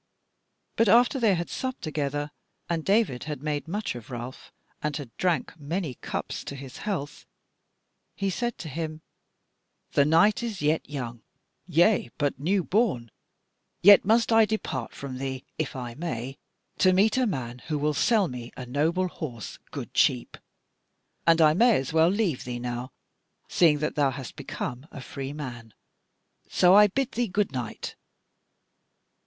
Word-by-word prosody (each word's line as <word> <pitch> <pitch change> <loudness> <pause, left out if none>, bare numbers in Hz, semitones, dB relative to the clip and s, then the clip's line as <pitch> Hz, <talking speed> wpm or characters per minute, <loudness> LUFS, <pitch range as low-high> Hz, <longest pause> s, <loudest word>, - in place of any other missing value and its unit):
But 230 -2 +4
after 245 +5 +5
they 220 -5 +4
had 170 0 -3
supped 260 0 -4
together, 145 -1 -2 0.4
and 165 -2 -1
David 195 - +1
had 150 -3 -5
made 150 0 -2
much 205 +5 -2
of 120 -3 -10
Ralph, 120 +1 -7 0.3
and 150 -1 -1
had 135 -6 -9
drank 180 -3 0
many 160 0 -3
cups - - -5
to 140 - -6
his 135 -2 -9
health, 175 -9 -4 0.9
he 195 -1 -1
said 240 +4 -2
to 165 - -7
him: 155 +1 -5 0.9
"The 140 - +4
night 165 +10 +4
is 225 -5 -4
yet 150 +2 0
young, 120 -5 -5 0.5
yea, 175 - +3
but 145 -3 -1
new 185 +6 +1
born; 180 - 0 0.7
yet 205 +1 +9
must 230 +4 +3
I 225 0 +7
depart 210 - -3
from 130 -2 -6
thee, 130 -1 -4 0.2
if 155 - -2
I 125 -2 -5
may, 135 -4 -5 0.4
to 185 -1 +5
meet 205 +4 +4
a 260 -1 +2
man 125 - -4
who 155 -2 -1
will 150 +1 +1
sell 205 +6 +3
me 125 -3 -7
a 125 - -6
noble 160 +8 +1
horse 125 - -7
good - - -7
cheap; - - +2 0.9
and 165 0 +6
I 155 -1 +6
may 210 - +4
well 160 +1 +5
leave 195 - 0
thee 125 -1 -4
now, 120 +1 -4 0.6
seeing 160 -4 +4
that 150 +1 -2
thou 145 -2 +2
hast 130 -1 -7
become 125 +4 -5
a - - -9
free 135 +1 -6
man; 120 -7 -8 0.7
so 180 0 +5
I 210 +1 +8
bid 265 +6 -1
thee 240 0 0
goodnight." 145 - -3
155 Hz, 155 wpm, -27 LUFS, 130-195 Hz, 0.9 s, yet